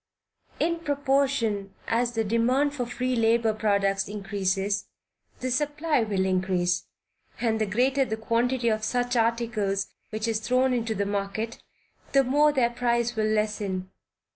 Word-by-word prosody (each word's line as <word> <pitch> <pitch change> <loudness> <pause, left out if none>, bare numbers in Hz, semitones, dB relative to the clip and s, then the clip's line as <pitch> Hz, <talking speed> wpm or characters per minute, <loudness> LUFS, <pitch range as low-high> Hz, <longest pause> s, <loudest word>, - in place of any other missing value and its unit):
In 335 +1 +1
proportion 270 -9 0
as 235 +1 +1
the 225 -1 0
demand 250 +7 +2
for 250 -4 -3
free 250 +1 -1
labor 230 -1 +3
products 200 -2 +1
increases, 200 0 -1 0.5
the 255 0 -2
supply 295 +2 +1
will 200 -4 0
increase, 185 -1 0 0.5
and 220 -2 0
the 215 - +1
greater 260 +6 +2
the 220 -4 -3
quantity 235 +2 +1
of 215 -1 0
such 245 +2 0
articles 225 -4 0 0.2
which 215 +1 -3
is 225 -1 0
thrown 255 +3 +2
into 230 -2 -1
the 200 0 0
market, 200 +3 -3 0.5
the 275 -1 +6
more 295 +4 +4
their 250 -4 +2
price 240 -1 0
will 215 -1 +1
lessen. 205 -3 -1
230 Hz, 140 wpm, -26 LUFS, 205-250 Hz, 0.5 s, the